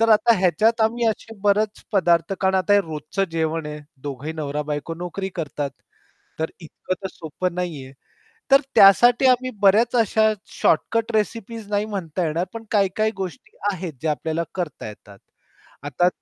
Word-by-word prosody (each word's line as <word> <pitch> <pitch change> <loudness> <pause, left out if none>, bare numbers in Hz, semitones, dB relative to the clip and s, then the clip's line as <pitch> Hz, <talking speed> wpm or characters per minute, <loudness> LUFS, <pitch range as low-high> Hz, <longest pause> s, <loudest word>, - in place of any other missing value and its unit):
तर 225 - +3
आता 220 +2 +6
ह्याच्यात 220 +5 +2
आम्ही 230 +1 +2
असे 225 +1 -2
बरेच 210 +1 +1
पदार्थ 170 -2 +2
कारण 190 0 +2
आता 190 +2 +2
हे 205 - +6
रोजचं 160 +3 -3
जेवण 160 -1 -1
आहे 150 0 -6 0.2
दोघंही 145 +2 -5
नवरा-बायको 150 +1 -3
नोकरी 180 +3 -5
करतात. 145 -3 -3 0.7
तर 160 - -2
इतकं 170 +3 -5
तर 190 - -3
सोपं 170 +2 -4
नाहीये. 155 -7 -4 0.6
तर 275 +1 +7
त्यासाठी 240 +6 +7
आम्ही 255 0 +3
बऱ्याच 215 +5 +4
अशा 220 -1 +3 0.2
शॉर्टकट 230 +8 +1
रेसिपीज 225 0 -3
नाही 205 0 +1
म्हणता 185 -4 -3
येणार, 165 +3 -1
पण 230 -1 -7
काही-काही 210 +1 +2
गोष्टी 185 -6 -7 0.2
आहेत 180 -2 -5
ज्या 160 - 0
आपल्याला 160 +2 -2
करता 170 -11 -4
येतात. 100 -1 -13 0.7
आता 145 +5 +2
185 Hz, 150 wpm, -22 LUFS, 160-215 Hz, 0.7 s, तर